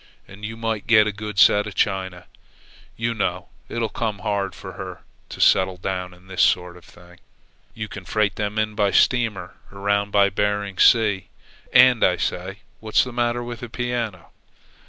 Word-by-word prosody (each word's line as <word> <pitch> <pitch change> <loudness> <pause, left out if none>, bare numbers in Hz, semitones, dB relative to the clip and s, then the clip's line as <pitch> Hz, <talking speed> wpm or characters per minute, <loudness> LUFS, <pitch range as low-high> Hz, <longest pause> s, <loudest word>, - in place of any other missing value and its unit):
And 100 +2 -14
you 110 +1 -5
might 115 -2 -3
get 110 -2 +6
a 105 - -1
good 105 0 -7
set 105 0 +5
of 105 - -8
china. 95 -3 -1 0.7
You 115 +1 -1
know 90 -5 -3 0.2
it'll 115 -1 -2
come 110 -2 -3
hard 100 -3 -1
for 95 -2 -9
her 90 0 -8 0.3
to - - -9
settle 95 -1 +3
down 90 0 -4
to 90 - -17
this 95 0 -3
sort 90 -1 +2
of 90 - -15
thing. 90 0 -18 0.6
You 110 -1 -5
can 100 -2 -9
freight 105 -1 0
them 105 0 -3
in 110 0 0
by 105 -1 +1
steamer 110 -5 +1
around 100 +1 -1
by 100 -1 +3
Bering 105 -1 -2
Sea. 105 -5 +4 0.4
And, 125 -3 +6
I 90 -1 +3
say, 95 +4 -4 0.2
what's 110 -1 +2
the 125 - -7
matter 120 0 0
with 120 -1 -7
a 120 - -7
piano?" 115 -6 -4
105 Hz, 175 wpm, -22 LUFS, 95-110 Hz, 0.7 s, get